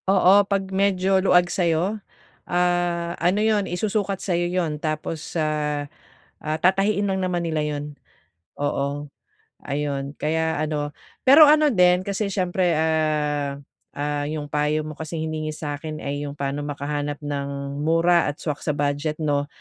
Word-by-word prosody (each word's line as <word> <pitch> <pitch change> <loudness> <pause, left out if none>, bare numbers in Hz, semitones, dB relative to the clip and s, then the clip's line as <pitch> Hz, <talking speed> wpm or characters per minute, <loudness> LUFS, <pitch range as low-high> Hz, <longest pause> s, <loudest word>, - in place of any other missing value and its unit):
Oo. 190 -1 +6 0.2
'Pag 195 -1 -1
medyo 190 -1 +2
luwag 180 -2 +5
sayo, 180 +4 0 0.5
ah, 175 -1 +1
ano 175 +4 +2
yun, 210 -3 +1
isusukat 200 +1 -1
sa'yo 175 -2 -1
yun, 165 -5 -1
tapos 155 +1 -4
sa, 155 - +1 0.9
ah, 155 0 -2
tatahiin 195 +2 +2
lang 190 - 0
naman 180 -2 -1
nila 160 -2 -1
yun. 145 -1 -3 0.8
Oo. 145 0 -2 0.5
Ayun, 140 -1 -3
kaya 160 0 0
ano, 150 -1 -2 0.3
pero 290 +4 +9
ano 300 0 +5
din 180 -1 +4
kasi 200 +2 -2
siyempre, 180 -3 0
ah, 150 -3 0 0.4
ah, 145 0 -2
yung 155 -1 -3
payo 150 +1 +1
mo 155 - -6
kasing 160 +1 -5
hiningi 155 -1 -3
sa'kin 155 +1 -5
ay 145 +1 -3
yung 140 - -7
pano 140 +1 -2
makahanap 145 0 -3
ng 140 -1 -4
mura 165 +2 +3
at 145 - -5
swak 150 -2 -4
sa 150 - -1
budget 145 +1 -1
'no? 145 -1 0
160 Hz, 145 wpm, -23 LUFS, 145-180 Hz, 0.9 s, pero